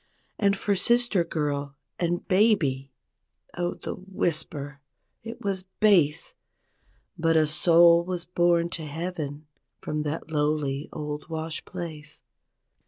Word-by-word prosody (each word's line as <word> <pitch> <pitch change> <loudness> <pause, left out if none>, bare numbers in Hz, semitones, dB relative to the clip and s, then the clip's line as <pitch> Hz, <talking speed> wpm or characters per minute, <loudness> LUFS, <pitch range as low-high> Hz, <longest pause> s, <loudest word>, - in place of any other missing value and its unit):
And 200 -1 +3
for 200 +1 0
sister 235 -2 +3
girl 145 -4 -2 0.2
and 175 0 -1
baby—Oh, 175 - -1
the - - -5
whisper— 150 -6 -3 0.4
27 225 - -5
it - - -25
was 190 -2 -1
base 180 -9 +3 0.9
But 165 -1 +3
a 155 - +5
soul 170 +2 +5
was 180 -1 -4
born 175 -1 +2
to 165 - -5
heaven 155 -2 -5 0.3
from 150 0 -3
that 150 +2 -4
lowly 150 -2 0
old 150 +1 -5
wash 160 0 -4
place. 155 -4 -8
165 Hz, 115 wpm, -26 LUFS, 150-180 Hz, 0.9 s, a